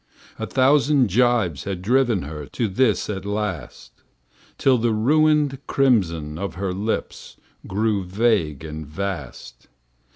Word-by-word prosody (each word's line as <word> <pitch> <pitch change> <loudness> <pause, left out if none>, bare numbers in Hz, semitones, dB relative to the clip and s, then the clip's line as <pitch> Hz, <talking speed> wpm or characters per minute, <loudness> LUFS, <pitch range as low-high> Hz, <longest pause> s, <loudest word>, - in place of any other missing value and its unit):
A - - -3
thousand 140 -1 +3
jibes 110 - +1
had 95 -2 -4
driven 120 -3 +2
her 75 -1 -7
To 115 - -2
this 110 +3 +1
at 95 -2 -4
last; 100 - -5 0.6
Till 130 -3 +3
the 115 0 +1
ruined 150 +3 +2
crimson 85 - +1
of 100 -3 -4
her 95 0 -3
lips 105 +4 -4 0.3
Grew 105 0 0
vague 90 - 0
and 80 0 -6
vast. 75 -8 -6
105 Hz, 125 wpm, -22 LUFS, 85-125 Hz, 0.6 s, thousand